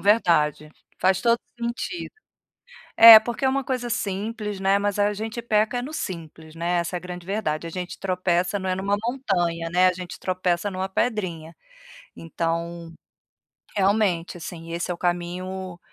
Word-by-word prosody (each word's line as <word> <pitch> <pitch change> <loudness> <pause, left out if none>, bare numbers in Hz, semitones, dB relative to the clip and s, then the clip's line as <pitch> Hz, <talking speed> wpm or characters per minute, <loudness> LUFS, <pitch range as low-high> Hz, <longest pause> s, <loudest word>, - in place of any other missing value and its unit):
verdade. 165 -7 +2 0.3
Faz 190 0 +2
todo 235 +2 +3 0.2
sentido. 240 +10 -4 0.8
É 225 -1 +12
porque 240 +4 -4
é - - +4
uma 275 +1 0
coisa 250 -2 -3
simples, 210 0 -3
né, 195 +1 +3
mas 205 0 -1
a 205 0 +3
gente 220 +3 -5
peca 220 +1 +1
é - - -3
no 280 +5 -6
simples, 160 - -7
né, 170 +1 0
essa 170 +1 -3
é - - -1
a - - -14
grande 180 -1 -8
verdade. 175 -6 -2
A - - -6
gente 180 +1 -6
tropeça, 180 0 0
não 190 -1 -4
é 185 - +1
numa 195 +2 0
montanha, 175 -10 -1
né, 180 +2 +4
a - - +2
gente 180 0 -8
tropeça 185 +1 -1
numa 190 0 -3
pedrinha. 185 -7 -2 0.6
Então, 170 0 -4 0.8
realmente, 190 -4 +1
assim, 165 0 -8
esse 170 +1 -3
é - - 0
o - - -12
caminho, 180 +1 -3
185 Hz, 165 wpm, -24 LUFS, 170-210 Hz, 0.8 s, É